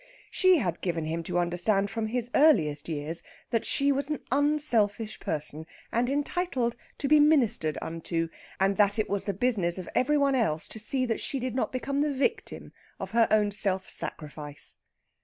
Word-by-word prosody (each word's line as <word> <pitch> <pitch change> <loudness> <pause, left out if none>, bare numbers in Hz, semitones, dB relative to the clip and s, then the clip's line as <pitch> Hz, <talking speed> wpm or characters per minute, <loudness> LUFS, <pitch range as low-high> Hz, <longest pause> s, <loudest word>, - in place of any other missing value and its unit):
She 370 -2 +5
had 175 - -2
given 170 -3 -2
him 165 +2 -2
to - - -2
understand 180 +4 +1
from 225 0 -2
his 240 +1 -2
earliest 165 - +3
years 155 +2 -2 0.3
that 230 -2 0
she 280 0 +2
was 280 +1 -1
an 300 - -2
unselfish 250 -7 +1
person, 155 +1 -3 0.2
and 240 +2 +1
entitled 280 -4 -1 0.2
to 280 - -2
be 300 +1 +6
ministered 240 - +3
unto, 165 0 -2 0.3
and 195 +1 +2
that 205 0 +3
it 215 - 0
was 200 -1 -2
the 200 - -1
business 195 -6 +1
of 185 - -6
every 295 +4 +2
one 280 -1 +2
else 185 -12 +1
to 220 - -7
see 255 +4 0
that 230 -2 -2
she 275 - -3
did 255 0 -3
not 255 - -1
become 275 +2 -2
the 295 0 +1
victim 270 - -2 0.3
of - - -6
her 230 0 +4
own 210 -1 +3
self 190 -2 +2
sacrifice. 150 -1 -5
220 Hz, 180 wpm, -28 LUFS, 175-270 Hz, 0.3 s, be